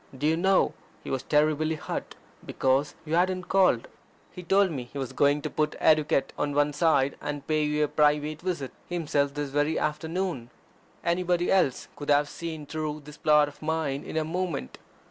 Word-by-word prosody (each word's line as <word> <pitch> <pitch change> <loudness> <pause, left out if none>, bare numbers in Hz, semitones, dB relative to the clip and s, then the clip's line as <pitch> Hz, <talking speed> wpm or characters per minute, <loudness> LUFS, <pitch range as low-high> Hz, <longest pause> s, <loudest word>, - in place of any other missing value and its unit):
Do 145 - -2
you 160 +1 +3
know, 190 +3 +3 0.3
he - - -6
was 130 - -1
terribly 155 +1 +2
hurt - - -5 0.3
because 135 +2 0
you 155 - -4
hadn't 185 +2 +2
called. 185 -12 +3 0.4
He 180 - -9
told 190 +2 +3
me 130 -5 -4
he 130 - -10
was 135 -3 -4
going 145 +1 +2
to 155 - -2
put 150 0 0
etiquette 150 -3 +3
on 145 -1 -1
one 145 0 +2
side, 145 -3 +2
and 145 -1 -4
pay 155 -1 +1
you 150 0 +1
a - - +2
private 150 +1 +1
visit 170 -7 -3 0.2
himself 145 -5 0
this 145 -2 -3
very 145 +2 +1
afternoon." 160 -4 -2 0.6
Anybody 175 0 +1
else 185 -9 +2
could 145 - -7
have 145 0 +4
seen 160 -3 -6
through 155 0 -4
this 150 +1 -11
plot 150 -1 +4
of 145 - -12
mine 155 -3 -1
in - - -5
a 155 - +1
moment. 170 - -3
150 Hz, 185 wpm, -27 LUFS, 145-165 Hz, 0.6 s, have